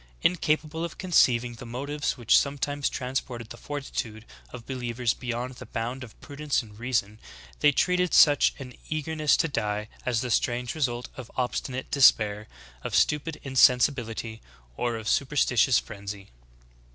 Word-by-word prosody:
Incapable 155 -1 +1
of 170 - -5
conceiving 125 -10 +3
the 115 - -11
motives 140 +6 -3
which 120 -3 +3
sometimes 145 0 +1
transported 125 -3 -4
the - - -7
fortitude 120 -6 -5 0.2
of 115 - -10
believers 125 -2 -2
beyond 125 +1 -4
the - - -10
bounds 120 +4 -4
of 115 - -13
prudence 145 -2 -2
and 105 -1 -15
reason, 115 -4 -1 0.4
they 145 - +5
treated 180 +4 +1
such 145 -2 +5
an 130 -3 -9 0.2
eag 155 -2 -2
erness 155 -2 +2
to 165 - +1
die 105 -6 -2
as 120 -3 0
the 125 - -3
strange 120 +1 0
result 125 -6 -2
of 130 -3 -8
obstinate 130 +1 -3
despair, 110 -6 +4 0.4
of - - -3
stupid 150 +1 +1
insensibility 125 -4 +2 0.3
or 120 - -1
of 110 -1 -6
superstitious 135 -2 +3
frenzy.'' 100 - -6
125 Hz, 145 wpm, -27 LUFS, 115-145 Hz, 0.4 s, they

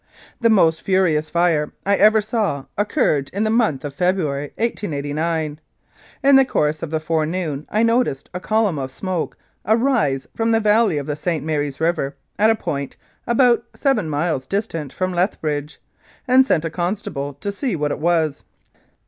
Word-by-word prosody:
The 230 - +3
most 165 -7 +4
furious 170 -5 +1
fire 170 -3 +1
I 200 +1 +3
ever 215 +2 +5
saw 205 - -1
occurred 155 -8 +1
in 200 +3 0
the 215 - +1
month 220 - +1
of 145 - -5
February, 155 -4 0
1889. 155 -6 -2 0.6
In 275 0 +6
the 270 - +7
course 150 - 0
of 165 - -4
the 160 0 -1
fore 155 0 0
noon 160 -4 -3
I 215 +2 +1
noticed 230 - +1
a 180 - -3
column 210 -5 +1
of 130 -1 -4
smoke 180 +4 -4 0.3
arise 220 - +1
from 225 0 0
the 225 - +4
valley 210 -5 +3
of 145 - -3
the 150 - -3
St. 155 -1 -2
Mary's 145 -3 -2
River 160 -4 0 0.2
at 215 +1 +5
a 225 - +4
point 140 -9 -4 0.3
about 240 0 +4
seven 270 - +1
miles 145 -3 -1
distant 165 -9 -3
from 185 +3 -2
Lethbridge, 155 -5 -2 0.5
and 260 +1 +5
sent 165 -7 +1
a 165 - -3
constable 175 -6 -3
to 200 +9 -4
see 225 +1 -2
what 150 -2 -1
it - - -3
was. 160 -3 +1
170 Hz, 170 wpm, -21 LUFS, 150-215 Hz, 0.6 s, the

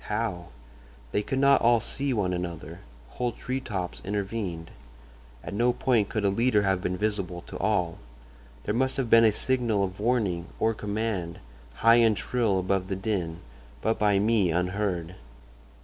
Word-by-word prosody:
How? 105 -6 -2 0.6
They 105 - +1
could 135 +5 -3
not 140 +1 +5
all 120 0 +5
see 140 +5 -2
one 100 -6 0
another—whole 85 - -6
tree 130 +4 -3
tops 95 -8 -5
intervened. 100 -4 -4 0.7
At - - -6
no 120 +4 +2
point 120 -4 +1
could 110 -2 -1
a - - +4
leader 110 0 +2
have 95 -2 +1
been 90 0 -2
visible 95 -4 -2
to - - -8
all. 90 -5 0 0.6
There 105 - -1
must 130 +3 0
have 130 -4 -2
been 115 0 +7
a 110 - +5
signal 115 -3 +1
of 95 0 -4
warning 105 -7 0
or 115 0 +2
command, 105 -5 -3 0.4
high 115 +1 +5
and 115 -3 +4
shrill 115 -6 0
above 95 0 0
the 95 - -2
din, 95 -5 -3 0.4
but 110 +1 +1
by 105 -2 +3
me 105 -2 +2
unheard. 90 0 -1
105 Hz, 160 wpm, -27 LUFS, 90-115 Hz, 0.7 s, been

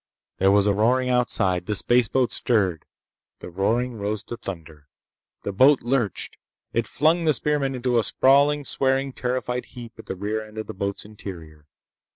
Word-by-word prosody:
There 95 - +4
was 100 0 +4
a 105 - +3
roaring 125 +5 +2
outside. 95 -8 +1
The 105 - 0
spaceboat 120 +2 +2
stirred. 95 -9 +1 0.5
The 90 - -10
roaring 115 +6 -1
rose 105 +1 -3
to 120 - -6
thunder. 80 -8 -9 0.6
The - - -3
boat 130 +8 +4
lurched. 120 -4 -2 0.4
It 115 0 0
flung 165 +3 +2
the 155 -2 +3
spearmen 140 -1 0
into 125 -1 +1
a - - +1
sprawling, 140 +4 +3
swearing, 135 0 0
terrified 125 0 -3
heap 115 -2 -10
at - - -12
the - - -4
rear 105 +3 -3
end 110 0 -14
of 110 - -4
the - - -7
boat's 100 +1 -4
interior. 85 -8 -10
115 Hz, 170 wpm, -24 LUFS, 100-130 Hz, 0.6 s, There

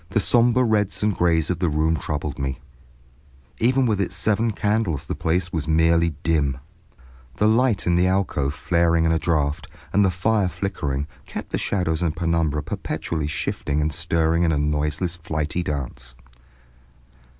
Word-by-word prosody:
The 100 - +1
sombre 120 +3 +4
reds 105 -4 +1
and 105 -2 +2
grays 85 -1 +2
of 90 - -2
the 90 - +1
room 80 +2 +1
troubled 75 -2 -4
me; 65 -1 -2 1.0
even 130 +3 +3
with 105 -4 +1
its 95 -1 -2
seven 110 +4 +1
candles 105 -7 0
the - - -3
place 85 +1 -1
was 80 -3 -2
merely 80 0 +3
dim. 75 -5 +1 0.8
The 105 - +2
light 115 0 +2
in 90 - +2
the 90 +1 +3
alcove 90 -7 0
flaring 85 -1 +2
in 80 - +3
a 80 - +2
draft, 75 -3 0 0.3
and 100 - +4
the 95 - +4
fire 95 +2 +1
flickering, 75 -9 -3 0.2
kept - - -7
the - - -1
shadows 85 -5 -1
and 85 -2 0
penumbra 85 -3 0
perpetually 80 -3 -3
shifting 75 -1 -2
and 75 0 0
stirring 80 +3 +1
in 85 -2 +3
a 75 - +1
noiseless 75 +4 -1
flighty 80 0 -2
dance. 65 -5 -4
85 Hz, 160 wpm, -23 LUFS, 75-95 Hz, 1.0 s, sombre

